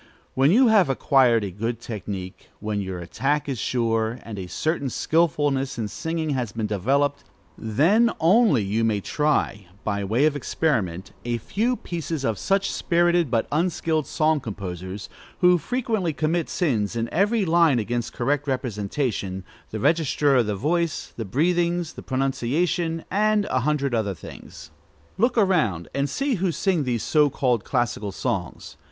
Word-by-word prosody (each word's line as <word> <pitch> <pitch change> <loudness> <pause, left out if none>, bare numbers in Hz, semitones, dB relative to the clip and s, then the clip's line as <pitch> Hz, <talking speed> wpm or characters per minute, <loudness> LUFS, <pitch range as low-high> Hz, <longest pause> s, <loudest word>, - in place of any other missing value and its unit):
When 135 +3 +3
you 240 +7 +5
have 205 -8 +5
acquired 130 -4 +3
a 100 - -4
good 115 +5 -3
technique, 100 -5 -7
when 105 0 -2
your 95 -2 -4
attack 135 - -1
is 135 -4 -3
sure, 115 0 0
and 110 -3 -7
a 90 - -6
certain 155 - -1
skilfulness 145 -3 +1
in 110 -3 -2
singing 160 +2 -3
has 125 -6 -2
been 115 -1 -2
developed, 135 +8 0 0.3
then 165 - +3
only 175 - +4
you 105 +4 0
may 110 -2 +1
try, 140 - 0 0.2
by 100 -1 -1
way 115 +9 +2
of 155 -1 +2
experiment, 100 - -1
a 120 0 -1
few 225 - -1
pieces 165 - -4
of 110 -3 -1
such 195 0 +1
spirited 175 -2 +2
but 115 -2 +1
unskilled 160 -1 0
song 155 -1 +1
composers, 95 -3 -6 0.3
who 180 -1 +5
frequently 220 - -1
commit 160 +4 -1
sins 120 - 0
in 115 0 -1
every 205 +4 +2
line 165 -5 +4
against 120 +1 -2
correct 145 +4 -1
representation, 105 -5 -2 0.3
the 110 - -5
register 150 0 +2
of 120 -4 +3
the 105 - -1
voice, 165 - -1
the 115 - -4
breathings, 170 - 0
the - - -9
pronunciation, 145 +6 -1
and 210 +1 +2
a 130 - +2
hundred 140 0 0
other 105 -4 0
things. - - -11 0.5
Look 240 +3 +2
around 155 - +2
and 140 +1 0
see 275 - -1
who 190 -2 +2
sing 170 -1 0
these 120 -4 -1
so 150 -2 +3
called 125 -5 0
classical 120 -5 -1
songs. 95 -4 -4
135 Hz, 155 wpm, -24 LUFS, 110-165 Hz, 0.5 s, you